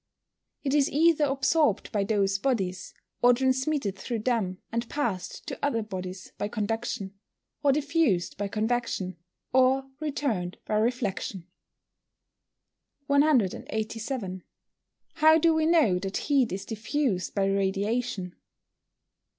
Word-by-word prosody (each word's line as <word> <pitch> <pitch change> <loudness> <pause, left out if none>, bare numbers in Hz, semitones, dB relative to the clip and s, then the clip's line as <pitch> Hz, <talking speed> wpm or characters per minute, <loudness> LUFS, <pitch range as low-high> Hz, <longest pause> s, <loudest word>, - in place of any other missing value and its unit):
_ - - -58 0.6
It 275 -2 0
is 290 -2 +3
either 310 +1 +4
absorbed 275 -3 +1
by 205 -2 +1
those 195 -2 +1
bodies, 190 -8 -2 0.3
or 245 0 +6
transmitted 260 -3 0
through 225 +3 -4
them 220 -7 0
and 230 +1 -2
passed 235 -11 -3
to - - -7
other 230 -6 +1
bodies 185 -2 -7
by 205 - -1
conduction, 210 -2 -3 0.4
or 285 - +4
diffused 285 - +1
by 205 +1 -2
convection, 215 -4 -1 0.4
or 260 +1 +4
returned 270 - -2
by - - -3
reflection. 215 -5 -1 1.6
187. 225 -6 0 0.8
_How 315 +1 +6
do 330 +1 +4
we 315 0 +2
know 300 - +4
that 195 +1 -3
heat 275 -5 +2
is 195 +2 -4
diffused 220 -2 -2
by 195 -1 +2
radiation? 195 +1 -1
230 Hz, 120 wpm, -27 LUFS, 195-275 Hz, 1.6 s, or